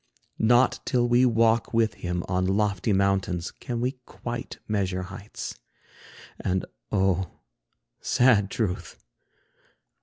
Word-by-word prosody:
Not 120 Hz, +3 st, +4 dB
till 120 Hz, -1 st, +1 dB
we 120 Hz, +1 st, +5 dB
walk 115 Hz, 0 st, +2 dB
with 115 Hz, -1 st, +3 dB
him 90 Hz, 0 st, -3 dB
on 90 Hz, 0 st, 0 dB
lofty 100 Hz, +1 st, +1 dB
mountains, 95 Hz, -3 st, +1 dB
Can 120 Hz, -1 st, -5 dB
we 125 Hz, +1 st, -2 dB
quite 120 Hz, 0 st, -6 dB
measure 95 Hz, -3 st, -1 dB
heights. 100 Hz, +3 st, -8 dB, 0.8 s
And, 95 Hz, 0 st, -1 dB, 0.3 s
oh, 95 Hz, -3 st, +1 dB, 0.7 s
sad 115 Hz, -6 st, +3 dB
truth! 100 Hz, -4 st, -3 dB
105 Hz, 110 wpm, -26 LUFS, 95-120 Hz, 0.8 s, we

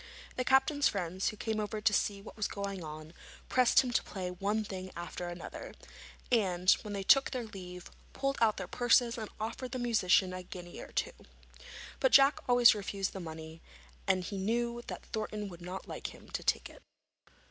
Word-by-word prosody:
The 255 Hz, -, 0 dB
captain's 270 Hz, +3 st, +4 dB
friends, 185 Hz, -1 st, -2 dB
who 215 Hz, -, -2 dB
came 220 Hz, 0 st, -2 dB
over 215 Hz, 0 st, -2 dB
to 210 Hz, 0 st, +2 dB
see 200 Hz, -1 st, 0 dB
what -, -, -11 dB
was 215 Hz, -2 st, -1 dB
going 200 Hz, -3 st, -4 dB
on, 155 Hz, +1 st, -8 dB, 0.4 s
pressed 255 Hz, -2 st, +5 dB
him 250 Hz, -, -3 dB
to -, -, +2 dB
play 185 Hz, -3 st, -5 dB
one 205 Hz, +4 st, -1 dB
thing 185 Hz, -2 st, -6 dB
after 175 Hz, +1 st, -5 dB
another, 175 Hz, 0 st, -8 dB, 0.6 s
and, 185 Hz, -6 st, +3 dB
when 210 Hz, -, -6 dB
they 195 Hz, -, -3 dB
took 275 Hz, +7 st, +6 dB
their 255 Hz, -2 st, -3 dB
leave, 180 Hz, -4 st, -9 dB, 0.2 s
pulled 275 Hz, 0 st, -1 dB
out 220 Hz, -2 st, +4 dB
their -, -, -4 dB
purses 245 Hz, 0 st, +3 dB
and 220 Hz, -3 st, -5 dB
offered 230 Hz, +3 st, -4 dB
the -, -, -1 dB
musician 205 Hz, -6 st, +3 dB
a 185 Hz, -, -5 dB
guinea 175 Hz, -1 st, -9 dB
or -, -, -9 dB
two. -, -, -1 dB, 0.9 s
But -, -, +2 dB
Jack 275 Hz, +1 st, +7 dB
always 245 Hz, -1 st, +8 dB
refused 200 Hz, -2 st, -3 dB
the 195 Hz, -, -5 dB
money, 160 Hz, -1 st, -8 dB, 0.5 s
as 185 Hz, -2 st, +1 dB
he 200 Hz, -, -4 dB
knew 235 Hz, +4 st, 0 dB
that -, -, -7 dB
Thornton 215 Hz, -2 st, -4 dB
would 175 Hz, -1 st, -11 dB
not 180 Hz, +2 st, -6 dB
like -, -, -5 dB
him -, -, -16 dB
to -, -, -3 dB
take -, -, +1 dB
it. -, -, -16 dB
205 Hz, 190 wpm, -32 LUFS, 185-235 Hz, 0.9 s, always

